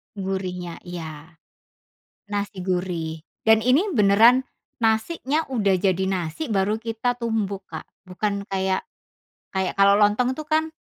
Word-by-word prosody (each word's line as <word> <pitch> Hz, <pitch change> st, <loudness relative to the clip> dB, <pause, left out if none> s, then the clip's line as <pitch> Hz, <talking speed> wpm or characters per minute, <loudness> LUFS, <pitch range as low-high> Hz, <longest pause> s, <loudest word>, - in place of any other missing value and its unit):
Gurihnya. 185 Hz, -3 st, -4 dB
Iya. 160 Hz, -2 st, -8 dB, 1.0 s
Nasi 200 Hz, -2 st, -3 dB
gurih. 180 Hz, -3 st, -2 dB, 0.2 s
Dan 220 Hz, 0 st, +6 dB
ini 270 Hz, -, +2 dB
beneran 230 Hz, -, +5 dB, 0.3 s
nasinya 255 Hz, +7 st, +1 dB
udah 205 Hz, -6 st, +2 dB
jadi 190 Hz, 0 st, +1 dB
nasi, 180 Hz, -, -2 dB
baru 210 Hz, 0 st, 0 dB
kita 230 Hz, +2 st, -2 dB
tumbuk 205 Hz, -4 st, -2 dB
Kak. -, -, -7 dB, 0.2 s
Bukan 200 Hz, +2 st, -3 dB
kayak 190 Hz, -, -1 dB, 0.7 s
kayak 190 Hz, -1 st, 0 dB
kalau 200 Hz, 0 st, +6 dB
lontong 215 Hz, +5 st, +3 dB
tuh 310 Hz, -, -5 dB
kan, 315 Hz, +1 st, +1 dB
200 Hz, 120 wpm, -23 LUFS, 185-230 Hz, 1.0 s, Dan